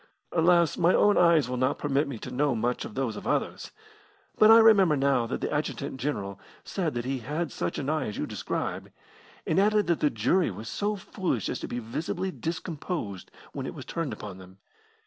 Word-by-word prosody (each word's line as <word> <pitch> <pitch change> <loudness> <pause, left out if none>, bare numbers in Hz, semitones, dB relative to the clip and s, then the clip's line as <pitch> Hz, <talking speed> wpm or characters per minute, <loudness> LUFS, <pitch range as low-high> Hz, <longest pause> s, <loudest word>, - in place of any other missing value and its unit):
"Alas, 170 -1 +3
my 175 +1 +4
own 205 0 +4
eyes 170 -5 +5
will 125 0 -3
not 130 +2 +1
permit 145 0 0
me 135 -4 -5
to 125 - -8
know 135 +1 +1
much 120 +2 -1
of 105 - -9
those 130 -5 -1
of - - -7
others! - - -1 0.7
But 215 - +6
I 225 - +10
remember 200 -9 +6
now 135 -3 +2
that 125 - -4
the - - -2
adjutant 145 -2 -3
general 100 -9 -3 0.2
said 165 -8 -2
that 120 0 -2
he 135 0 -2
had 150 +7 -3
such - - -3
an 140 - -3
eye 155 -2 0
as 105 - -5
you - - -1
describe, - - -4 0.5
and 160 - +2
added 210 +1 +3
that 170 -2 +1
the 150 - +3
jury 130 - +1
was 105 +3 -8
so 210 - -1
foolish 185 - -3
as - - -3
to - - -5
be 120 - -4
visibly 160 +11 -3
discomposed 160 - -5 0.2
when - - -4
it - - -6
was - - -8
turned 165 -4 -3
upon 95 -3 -8
them. 95 0 -14
145 Hz, 205 wpm, -27 LUFS, 120-175 Hz, 0.7 s, I